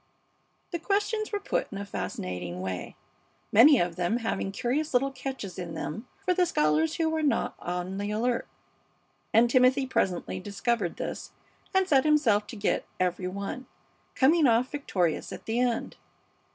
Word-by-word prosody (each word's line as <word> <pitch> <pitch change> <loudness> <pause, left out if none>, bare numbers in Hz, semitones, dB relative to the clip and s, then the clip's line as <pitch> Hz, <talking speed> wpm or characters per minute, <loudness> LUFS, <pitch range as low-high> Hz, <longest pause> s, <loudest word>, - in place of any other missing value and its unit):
The 345 - -2
questions 420 +4 0
were 410 - -1
put 400 - -2
in 200 - -5
a 200 - -4
fascinating 90 - -4
way, 95 -1 -5 0.6
many 265 +7 +8
of 175 -4 0
them 180 +6 +1
having 225 -4 -2
curious 260 +8 -1
little 275 +2 +3
catches 260 -8 -6
in 175 -2 -5
them 220 +11 -5 0.2
for 365 - +3
the 360 -1 +2
scholars 155 - +2
who 325 - +1
were 320 0 0
not 295 -2 +1
on 180 +2 -4
the 205 0 -2
alert, 235 +3 0 0.8
and 230 +2 +5
Timothy 255 +2 +4
presently 190 -8 -1
discovered 205 0 -1
this - - -5 0.4
and 380 -1 +2
set 275 -6 +4
himself 245 -10 +3
to 235 - -8
get 205 -1 0 0.2
every 180 0 0
one, 200 +7 -5 0.5
coming 300 +3 +5
off 235 +2 +3
victorious 185 - -1
at - - -8
the 225 +2 -1
end. 245 -2 -1
235 Hz, 160 wpm, -28 LUFS, 185-280 Hz, 0.8 s, many